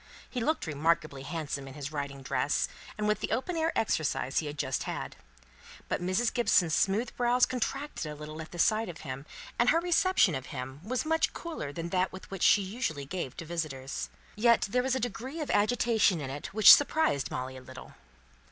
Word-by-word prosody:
He 250 Hz, -, -4 dB
looked 310 Hz, +7 st, 0 dB
remarkably 155 Hz, -2 st, 0 dB
handsome 145 Hz, -2 st, -4 dB
in 135 Hz, -, -10 dB
his 145 Hz, 0 st, -6 dB
riding 140 Hz, -2 st, -5 dB
dress, 135 Hz, +1 st, 0 dB, 0.3 s
and 210 Hz, 0 st, -1 dB
with 210 Hz, -1 st, +1 dB
the -, -, -3 dB
open 265 Hz, +10 st, -1 dB
air 325 Hz, 0 st, +1 dB
exercise 155 Hz, -9 st, 0 dB
he 155 Hz, -, -4 dB
had 145 Hz, 0 st, -6 dB
just 130 Hz, -3 st, -1 dB
had. -, -, -5 dB, 0.7 s
But -, -, -2 dB
Mrs. 185 Hz, +6 st, +1 dB
Gibson's 185 Hz, -9 st, +3 dB
smooth 205 Hz, +8 st, +1 dB
brows 245 Hz, 0 st, +3 dB
contracted 255 Hz, -, -3 dB
a -, -, -7 dB
little 155 Hz, +1 st, -8 dB
at 160 Hz, -, -9 dB
the 175 Hz, -, -8 dB
sight 215 Hz, +4 st, +2 dB
of 165 Hz, -3 st, -8 dB
him, 135 Hz, 0 st, -7 dB, 0.3 s
and 240 Hz, +1 st, +4 dB
her 330 Hz, -, +4 dB
reception 350 Hz, -, +3 dB
of 130 Hz, -1 st, -4 dB
him 130 Hz, +1 st, -6 dB
was 250 Hz, +8 st, -2 dB
much 320 Hz, +1 st, +1 dB
cooler 325 Hz, -, -5 dB
than 165 Hz, +3 st, -5 dB
that 185 Hz, +1 st, +1 dB
which 190 Hz, 0 st, -8 dB
she 205 Hz, -, +5 dB
usually 190 Hz, -, -3 dB
gave 145 Hz, -4 st, -5 dB
to 170 Hz, -, -6 dB
visitors. 135 Hz, -, -4 dB, 0.3 s
Yet 235 Hz, +2 st, +4 dB
there 250 Hz, +5 st, +1 dB
was 260 Hz, 0 st, 0 dB
a -, -, 0 dB
degree 245 Hz, +6 st, -4 dB
of 300 Hz, -, -2 dB
agitation 215 Hz, -3 st, +3 dB
in 135 Hz, -3 st, -5 dB
it, 145 Hz, +1 st, -5 dB
which 215 Hz, +1 st, +9 dB
surprised 290 Hz, -, +2 dB
Molly 130 Hz, +1 st, -4 dB
a 130 Hz, -, -9 dB
little. 130 Hz, 0 st, -11 dB
175 Hz, 200 wpm, -30 LUFS, 145-240 Hz, 0.7 s, which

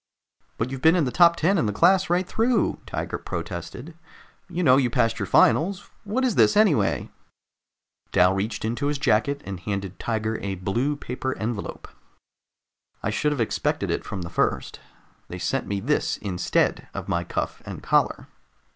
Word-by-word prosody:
"But 120 Hz, +3 st, -2 dB
you've 135 Hz, -1 st, -5 dB
been 160 Hz, +3 st, +5 dB
in 175 Hz, -, +3 dB
the 125 Hz, -, -2 dB
top 170 Hz, +2 st, +5 dB
ten 175 Hz, +3 st, +2 dB
in 115 Hz, -, +1 dB
the -, -, 0 dB
class 185 Hz, -, +3 dB
right 175 Hz, +1 st, +1 dB
through!" 225 Hz, +1 st, +1 dB
Tiger -, -, -4 dB
protested. 85 Hz, -, -6 dB, 0.6 s
"You 180 Hz, 0 st, -2 dB
know 130 Hz, -4 st, +6 dB
you 130 Hz, -3 st, +2 dB
passed 115 Hz, -2 st, +1 dB
your 100 Hz, -, -2 dB
finals. 180 Hz, -, +3 dB
What 240 Hz, +6 st, 0 dB
is 250 Hz, -, +1 dB
this, 210 Hz, -, +4 dB
anyway?" 155 Hz, -, +2 dB, 1.0 s
Dal 90 Hz, +1 st, +4 dB
reached 105 Hz, +3 st, -2 dB
into 120 Hz, +6 st, -1 dB
his 145 Hz, 0 st, 0 dB
jacket 140 Hz, +3 st, +1 dB
and 95 Hz, -2 st, -6 dB
handed 100 Hz, -1 st, -4 dB
Tiger 110 Hz, -1 st, -2 dB
a 100 Hz, -1 st, -3 dB
blue 115 Hz, +11 st, -1 dB
paper 130 Hz, -1 st, -4 dB
envelope. 110 Hz, -1 st, -4 dB, 1.2 s
"I 105 Hz, -, 0 dB
should 150 Hz, +7 st, 0 dB
have 145 Hz, -, -2 dB
expected 115 Hz, -, -1 dB
it -, -, -2 dB
from 95 Hz, -3 st, -5 dB
the 85 Hz, -, -7 dB
first. -, -, -1 dB, 0.5 s
They 90 Hz, -, -7 dB
sent 90 Hz, +10 st, -2 dB
me 100 Hz, -1 st, -2 dB
this 145 Hz, +9 st, 0 dB
instead 95 Hz, -4 st, 0 dB
of -, -, -5 dB
my 85 Hz, 0 st, 0 dB
cuff -, -, -4 dB
and -, -, -8 dB
collar." -, -, +1 dB
125 Hz, 175 wpm, -24 LUFS, 100-165 Hz, 1.2 s, know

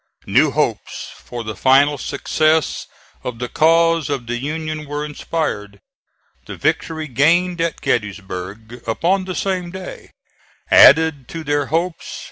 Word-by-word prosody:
New -, -, +4 dB
hopes -, -, -2 dB
for 120 Hz, -1 st, -7 dB
the 110 Hz, -1 st, -5 dB
final 135 Hz, +6 st, +4 dB
success 155 Hz, +2 st, 0 dB, 0.4 s
of 125 Hz, -2 st, -5 dB
the 125 Hz, +1 st, -4 dB
cause 165 Hz, +1 st, +3 dB
of 135 Hz, -4 st, -2 dB
the 120 Hz, +1 st, -3 dB
Union 155 Hz, +2 st, -4 dB
were 145 Hz, +1 st, -3 dB
inspired. 125 Hz, -10 st, -4 dB, 0.7 s
The -, -, -6 dB
victory 160 Hz, -1 st, -1 dB
gained 165 Hz, +7 st, +2 dB
at 165 Hz, -1 st, -2 dB
Gettysburg, 105 Hz, +2 st, -4 dB
upon 185 Hz, +11 st, +1 dB
the 185 Hz, -1 st, -5 dB
same 185 Hz, -3 st, -2 dB
day, 185 Hz, +1 st, -9 dB, 0.6 s
added 150 Hz, -4 st, +6 dB
to 165 Hz, -1 st, -7 dB
their 145 Hz, -2 st, 0 dB
hopes. 165 Hz, +2 st, -2 dB
150 Hz, 130 wpm, -19 LUFS, 120-165 Hz, 0.7 s, added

